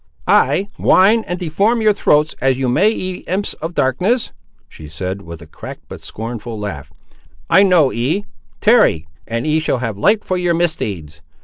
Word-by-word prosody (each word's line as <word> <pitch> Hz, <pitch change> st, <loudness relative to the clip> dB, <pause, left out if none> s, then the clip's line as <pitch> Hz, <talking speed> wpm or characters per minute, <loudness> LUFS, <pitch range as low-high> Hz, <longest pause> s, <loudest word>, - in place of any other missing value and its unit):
"Ay, 150 Hz, +10 st, +3 dB
whine 215 Hz, +4 st, +4 dB
and 180 Hz, -, -3 dB
deform 195 Hz, +7 st, 0 dB
your 215 Hz, -1 st, +3 dB
throats 150 Hz, -5 st, +2 dB
as 135 Hz, -1 st, +2 dB
you 130 Hz, -1 st, -1 dB
may, 190 Hz, -, +3 dB
ye 185 Hz, -4 st, -4 dB
imps 190 Hz, +4 st, -1 dB
of 165 Hz, +2 st, -5 dB
darkness," 185 Hz, -, 0 dB, 0.4 s
she 75 Hz, -, -12 dB
said, 90 Hz, +5 st, -5 dB
with 85 Hz, -1 st, -10 dB
a -, -, -12 dB
cracked 75 Hz, -, -10 dB
but -, -, -10 dB
scornful 115 Hz, 0 st, -6 dB
laugh; 75 Hz, -10 st, -6 dB, 0.6 s
"I 195 Hz, -, +7 dB
know 180 Hz, -8 st, +4 dB
ye; 145 Hz, -, -1 dB, 0.4 s
tarry, 210 Hz, -, +4 dB, 0.2 s
and 115 Hz, +1 st, -3 dB
ye 155 Hz, +1 st, +2 dB
shall 155 Hz, -4 st, -1 dB
have 115 Hz, -5 st, -4 dB
light 210 Hz, -, +2 dB
for 185 Hz, -, -1 dB
your 175 Hz, -1 st, +1 dB
misdeeds. 100 Hz, -, -3 dB
150 Hz, 175 wpm, -17 LUFS, -, 0.6 s, I